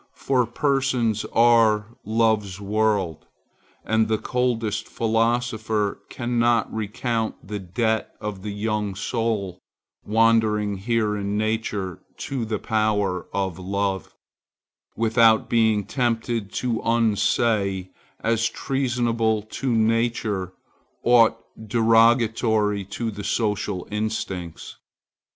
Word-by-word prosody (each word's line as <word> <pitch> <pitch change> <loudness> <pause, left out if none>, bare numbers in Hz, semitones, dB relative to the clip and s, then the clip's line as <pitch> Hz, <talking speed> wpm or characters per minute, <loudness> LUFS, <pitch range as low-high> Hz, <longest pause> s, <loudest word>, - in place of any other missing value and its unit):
For 125 -3 +1
persons 130 -4 0
are 115 -1 +3
love's 110 -3 +1
world, 100 -5 0 0.6
and 110 0 +2
the 110 0 +1
coldest 115 -3 -1
philosopher 115 -2 0
cannot 120 -2 +1
recount 110 +1 -2
the 105 0 -4
debt 110 +4 -1
of 105 -2 -5
the 105 - -5
young 105 -1 -2
soul 110 -3 -2 0.4
wandering 110 -2 +2
here 110 +1 0
in 100 0 -2
nature 105 -4 -2 0.2
to 130 -4 -3
the 110 0 -2
power 105 -4 0
of 95 -2 -2
love, 95 0 -2 0.8
without 115 0 +3
being 110 -3 +3
tempted 115 -2 -1
to 120 -3 -1
unsay, 105 -4 +1 0.3
as 115 0 +1
treasonable 120 -4 0
to 125 +4 -3
nature, 110 -4 0 0.5
aught 120 -2 +5 0.3
derogatory 115 -2 +3
to 115 +4 -4
the 100 0 -7
social 105 -3 -1
instincts. 105 -5 -4
110 Hz, 95 wpm, -23 LUFS, 105-115 Hz, 0.8 s, aught